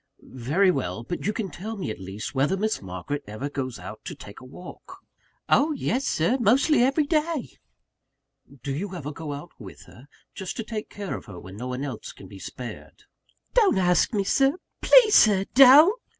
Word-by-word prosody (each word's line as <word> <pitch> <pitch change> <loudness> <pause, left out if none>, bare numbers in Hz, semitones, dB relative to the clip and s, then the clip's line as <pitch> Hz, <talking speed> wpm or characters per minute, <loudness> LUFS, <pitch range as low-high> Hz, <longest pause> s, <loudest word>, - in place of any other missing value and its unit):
"Very 150 +10 +2
well; 115 - -3
but 175 +9 -5
you - - +2
can 210 -3 -4
tell 220 +4 -7
me 180 - -4
at - - -8
least, 95 +6 -7
whether 145 +8 +1
Miss 215 +2 -1
Margaret 95 +9 -5
ever 110 +8 -6
goes 130 -4 -4
out - - -10
to - - -6
take 100 - -12
a - - -15
walk?" 175 +8 -12 0.5
"Oh, 305 +2 +3
yes, 265 -1 -2
Sir; 175 +12 +1
mostly 255 - +3
every 275 +4 +2
day." 305 -2 -1 1.1
"Do 140 - -3
you 185 +6 -5
ever 150 -4 -6
go 155 0 -7
out 145 +4 -8
with 100 -6 -11
her? 130 +4 -17 0.3
just 190 -2 -6
to 225 - -3
take 215 -1 -6
care 200 -2 -5
of - - -9
her 100 -6 -10
when 95 +2 -11
no 125 +5 -6
one 125 +2 -4
else - - -6
can - - -13
be - - -12
spared?" - - -9 0.5
"Don't 420 - +4
ask 180 -1 +2
me 205 -4 -1 0.6
please, 475 -4 +6
Sir, 195 -3 +5
don't!" 295 - +7
185 Hz, 190 wpm, -25 LUFS, -, 1.1 s, don't